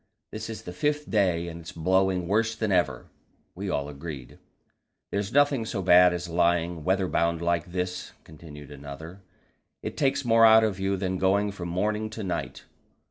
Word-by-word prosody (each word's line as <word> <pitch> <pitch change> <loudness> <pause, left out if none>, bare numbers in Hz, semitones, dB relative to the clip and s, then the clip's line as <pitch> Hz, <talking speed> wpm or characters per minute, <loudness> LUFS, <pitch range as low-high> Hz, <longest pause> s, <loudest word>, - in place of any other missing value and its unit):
This 110 +1 -6
is 110 - -7
the 90 - -7
fifth 150 +8 -1
day, 90 -5 +1
and 85 0 -7
it's 80 - -9
blowing 95 +1 +1
worse 110 +3 +1
than 110 -2 -2
ever." 70 -9 +1 0.5
We 95 +2 -5
all 70 -5 -1
agreed. 70 -3 -8 0.7
"There's 100 +1 -2
nothing 145 -3 +3
so 105 -3 -4
bad 90 0 +7
as 90 0 -4
lying 85 -1 +1
weather 95 +2 +1
bound 85 -1 0
like 85 0 -1
this," 90 0 -4
continued 75 -2 -12
another; 75 +6 -9 0.6
"it - - -5
takes 135 -1 0
more 115 -1 +5
out 110 0 +8
of 105 -4 -1
you 95 0 0
than 95 -1 -2
going 100 +2 +2
from 90 -3 -6
morning 105 +5 -1
to 110 0 -7
night." 90 -2 -4
90 Hz, 175 wpm, -26 LUFS, 85-105 Hz, 0.7 s, out